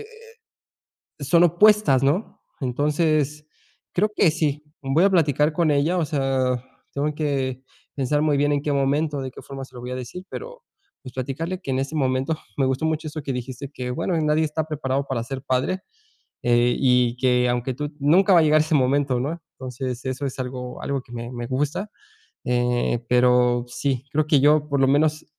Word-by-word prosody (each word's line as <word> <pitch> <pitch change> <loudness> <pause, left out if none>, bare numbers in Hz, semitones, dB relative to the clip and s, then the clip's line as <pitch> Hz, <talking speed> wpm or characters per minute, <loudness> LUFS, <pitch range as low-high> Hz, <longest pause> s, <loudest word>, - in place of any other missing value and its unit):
eh, 430 - -13 1.2
son 170 +4 +5
opuestas, 175 -6 +4
¿no? 155 +10 -1 0.2
Entonces, 150 +2 0 0.5
creo 210 +4 +2
que 170 -6 +4
sí. 150 -2 -1 0.2
Voy 145 +6 +3
a 200 - +5
platicar 150 -3 +2
con 160 -1 +2
ella, 150 +6 +2
o 170 - +1
sea, 135 -4 0 0.4
tengo 145 +2 -1
que 135 -4 -2 0.3
pensar 145 +2 0
muy 150 -2 +2
bien 145 +1 +2
en 145 - 0
qué 150 - -1
momento, 140 +1 0
de 130 -1 -5
qué - - -11
forma 135 -1 -8
se 130 - -23
lo - - -8
voy 125 - -6
a 125 - -3
decir, 130 +9 -7
pero, - - -8 0.4
pues, 130 - -10
platicarle 165 +8 -4
que 135 - -4
en 130 - 0
ese 135 +4 -3
momento 135 +2 0 0.2
me 135 - +2
gustó 130 +4 -1
mucho 160 0 -1
eso 150 -1 -6
que 135 - -3
dijiste 130 +3 -6
que, 125 -1 -4
bueno, 170 +7 -1
nadie 150 +1 +2
está 155 0 -2
preparado 140 -3 -2
para 120 -4 -2
ser 130 +2 -6
padre, 130 +8 0 0.6
eh, 120 0 +3
y 125 -2 +3
que 125 -1 +2
aunque 125 +1 -1
tú 150 +3 -5
nunca 185 +7 +4
va 175 - +7
a - - +4
llegar 155 0 +4
ese 155 +1 -1
momento, 135 -1 +2
¿no? 155 +7 -3
Entonces, 125 -1 -5
eso 130 +2 -3
es 135 -1 -5
algo 125 -1 -5
algo 140 -1 -2
que 120 - -19
me 120 +1 -6
me 120 -1 -5
gusta. 150 +10 -2 0.5
Eh, 120 -1 +1
pero 125 0 +3
sí, 130 0 -2
creo 155 0 +1
que 150 -3 +4
yo, 150 +1 +4
por 140 -1 0
lo 135 - +4
menos, 155 +2 +2
140 Hz, 195 wpm, -23 LUFS, 130-155 Hz, 1.2 s, va